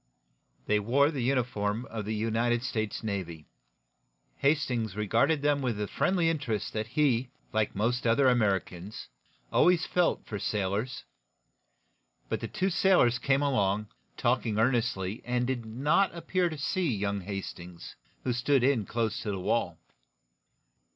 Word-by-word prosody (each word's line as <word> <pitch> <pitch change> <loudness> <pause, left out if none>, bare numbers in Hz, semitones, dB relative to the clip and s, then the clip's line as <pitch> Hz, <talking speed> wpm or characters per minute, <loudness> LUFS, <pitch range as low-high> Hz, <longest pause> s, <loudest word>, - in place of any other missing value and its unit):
They 105 0 +2
wore 135 +8 +3
the 140 -5 -3
uniform 120 -3 0
of 110 -2 -6
the 110 +1 -2
United 115 +2 0
States 110 -4 -3
Navy. 90 -7 -4 0.9
Hastings 125 -8 0
regarded 115 +9 +1
them 145 -1 +2
with 120 -5 -1
the 105 - -1
friendly 180 - +1
interest 140 -10 -1
that 110 0 -2
he, 130 -2 +1 0.2
like 110 -1 0
most 120 +4 0
other 130 +4 +4
Americans, 100 - 0 0.4
always 180 -1 +4
felt 180 -1 +1
for 105 - -5
sailors. 105 +6 -2 1.3
But - - -1
the 115 - -4
two 185 - -1
sailors 170 -11 +4
came 135 +3 +2
along, 105 -6 +1 0.3
talking 120 -3 +1
earnestly, 115 -4 0
and 125 0 0
did 120 -3 -3
not 150 - +1
appear 175 +1 0
to 155 - -6
see 165 +3 0
young 100 -2 -1
Hastings, 90 -2 -7 0.3
who 125 - 0
stood 125 +2 +2
in 125 -6 +2
close 115 -2 -1
to 105 - -4
the 100 -2 -2
wall. 90 - 0
120 Hz, 140 wpm, -29 LUFS, 105-140 Hz, 1.3 s, other